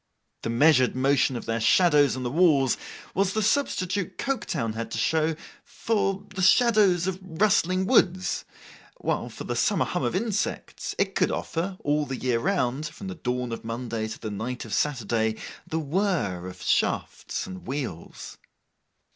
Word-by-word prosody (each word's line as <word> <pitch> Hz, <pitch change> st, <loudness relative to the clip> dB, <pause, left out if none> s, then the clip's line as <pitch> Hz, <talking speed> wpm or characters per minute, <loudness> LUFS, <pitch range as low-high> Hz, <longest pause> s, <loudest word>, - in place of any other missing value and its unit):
The -, -, -3 dB
measured 130 Hz, +1 st, +4 dB
motion 135 Hz, 0 st, +2 dB
of 120 Hz, -, -5 dB
their 115 Hz, 0 st, -1 dB
shadows 145 Hz, +3 st, +4 dB
on 130 Hz, -, -4 dB
the 120 Hz, -, -2 dB
walls, 145 Hz, -6 st, +4 dB, 0.4 s
was 195 Hz, 0 st, +1 dB
the 215 Hz, -, 0 dB
substitute 200 Hz, -, 0 dB
Coketown 170 Hz, -, -2 dB
had 115 Hz, 0 st, -4 dB
to 115 Hz, -, -4 dB
show 160 Hz, +6 st, +1 dB, 0.3 s
for 200 Hz, -3 st, -1 dB
the 190 Hz, -, -3 dB
shadows 195 Hz, -3 st, +4 dB
of 190 Hz, -1 st, -2 dB
rustling 185 Hz, 0 st, +1 dB
woods; 185 Hz, -5 st, +2 dB, 0.5 s
while, -, -, -2 dB
for -, -, -8 dB
the -, -, -3 dB
summer -, -, +2 dB
hum -, -, -2 dB
of -, -, -1 dB
insects, 210 Hz, -3 st, -2 dB
it -, -, 0 dB
could -, -, +2 dB
offer, 185 Hz, +3 st, -3 dB
all 145 Hz, 0 st, +1 dB
the 130 Hz, -, -4 dB
year 125 Hz, -2 st, 0 dB
round, 150 Hz, -5 st, 0 dB
from 190 Hz, +6 st, -8 dB
the -, -, -4 dB
dawn 125 Hz, -6 st, -3 dB
of 115 Hz, -, -5 dB
Monday 115 Hz, -1 st, -3 dB
to 110 Hz, -, -6 dB
the 110 Hz, -, -5 dB
night 120 Hz, +5 st, -4 dB
of 110 Hz, -, -7 dB
Saturday, 115 Hz, -5 st, 0 dB, 0.3 s
the 160 Hz, -, -2 dB
whirr 150 Hz, -, -1 dB
of 95 Hz, -, -9 dB
shafts -, -, -1 dB
and 95 Hz, 0 st, -9 dB
wheels. 125 Hz, -, -6 dB
150 Hz, 165 wpm, -26 LUFS, 120-185 Hz, 0.5 s, measured